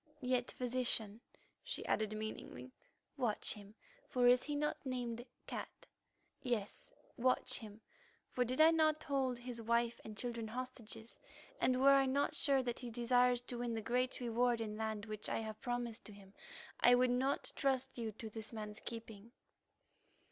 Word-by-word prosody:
"Yet, 250 Hz, -1 st, +1 dB
Physician," 235 Hz, -3 st, -1 dB, 0.4 s
she -, -, -4 dB
added 215 Hz, 0 st, 0 dB
meaningly, 215 Hz, -12 st, -6 dB, 0.5 s
"watch 240 Hz, -6 st, +1 dB
him, 205 Hz, 0 st, -12 dB, 0.3 s
for 250 Hz, -2 st, +4 dB
is 250 Hz, 0 st, +7 dB
he 295 Hz, -, -3 dB
not 300 Hz, +1 st, -1 dB
named 245 Hz, -3 st, -3 dB, 0.2 s
'Cat'? -, -, -6 dB, 0.6 s
Yes, 240 Hz, -, -2 dB, 0.3 s
watch 255 Hz, +1 st, +2 dB
him, 215 Hz, -2 st, -10 dB, 0.5 s
for 250 Hz, -, +2 dB
did 255 Hz, +3 st, -2 dB
I 315 Hz, +1 st, +9 dB
not 310 Hz, -1 st, +3 dB
hold 265 Hz, -3 st, 0 dB
his 240 Hz, -1 st, -6 dB
wife 235 Hz, +1 st, +1 dB
and 215 Hz, -1 st, -8 dB
children 235 Hz, -2 st, -3 dB
hostages, 235 Hz, -2 st, -6 dB, 0.4 s
and 255 Hz, 0 st, +3 dB
were 275 Hz, +1 st, +7 dB
I 270 Hz, -1 st, +5 dB
not 280 Hz, +3 st, +1 dB
sure 280 Hz, -4 st, +3 dB
that 240 Hz, -2 st, -2 dB
he 245 Hz, -, -5 dB
desires 245 Hz, +1 st, +3 dB
to 245 Hz, -1 st, -4 dB
win 240 Hz, -1 st, -1 dB
the 225 Hz, -, -2 dB
great 250 Hz, +3 st, 0 dB
reward 240 Hz, 0 st, +2 dB
in 215 Hz, -2 st, -3 dB
land 220 Hz, -1 st, -2 dB
which 215 Hz, -1 st, -4 dB
I -, -, 0 dB
have 220 Hz, -1 st, -6 dB
promised 245 Hz, -2 st, -3 dB
to 210 Hz, -, -9 dB
him, 195 Hz, -1 st, -15 dB, 0.5 s
I 245 Hz, -, +7 dB
would 250 Hz, 0 st, +4 dB
not 265 Hz, +3 st, 0 dB
trust 265 Hz, -2 st, 0 dB
you 230 Hz, -2 st, -3 dB
to 220 Hz, +1 st, -7 dB
this 220 Hz, 0 st, -7 dB
man's 215 Hz, -2 st, -6 dB
keeping." 225 Hz, -2 st, -8 dB
240 Hz, 165 wpm, -37 LUFS, 220-255 Hz, 0.6 s, I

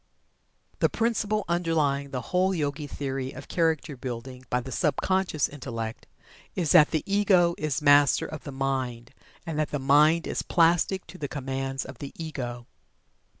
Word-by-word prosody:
The -, -, +3 dB
principle 215 Hz, -2 st, 0 dB
underlying 155 Hz, -5 st, 0 dB
the 130 Hz, -2 st, -3 dB
whole 185 Hz, +1 st, +3 dB
Yogi 145 Hz, -1 st, -2 dB
theory 135 Hz, -2 st, -4 dB
of 130 Hz, -, -10 dB
Character 160 Hz, -4 st, 0 dB
Building 125 Hz, 0 st, -7 dB
by 125 Hz, -, +1 dB
the 130 Hz, +2 st, -7 dB
sub 105 Hz, -, +1 dB
conscious 185 Hz, -6 st, +1 dB
Intellect, 115 Hz, -5 st, -6 dB, 0.5 s
is 170 Hz, -5 st, 0 dB
that 150 Hz, -, +7 dB
the 155 Hz, -, -1 dB
Ego 195 Hz, -4 st, +3 dB
is 150 Hz, -1 st, -2 dB
Master 145 Hz, -1 st, +5 dB
of 155 Hz, -1 st, -7 dB
the 140 Hz, -, -7 dB
mind, 130 Hz, -3 st, -3 dB, 0.3 s
and 160 Hz, -2 st, -3 dB
that 155 Hz, -, 0 dB
the 145 Hz, -, -2 dB
mind 150 Hz, +5 st, +4 dB
is -, -, -2 dB
plastic 175 Hz, +2 st, +2 dB
to 180 Hz, +3 st, -12 dB
the 145 Hz, -, -3 dB
commands 135 Hz, -1 st, -3 dB
of 130 Hz, -2 st, -10 dB
the 140 Hz, -, -6 dB
Ego. 125 Hz, -7 st, -5 dB
145 Hz, 160 wpm, -27 LUFS, 135-165 Hz, 0.5 s, that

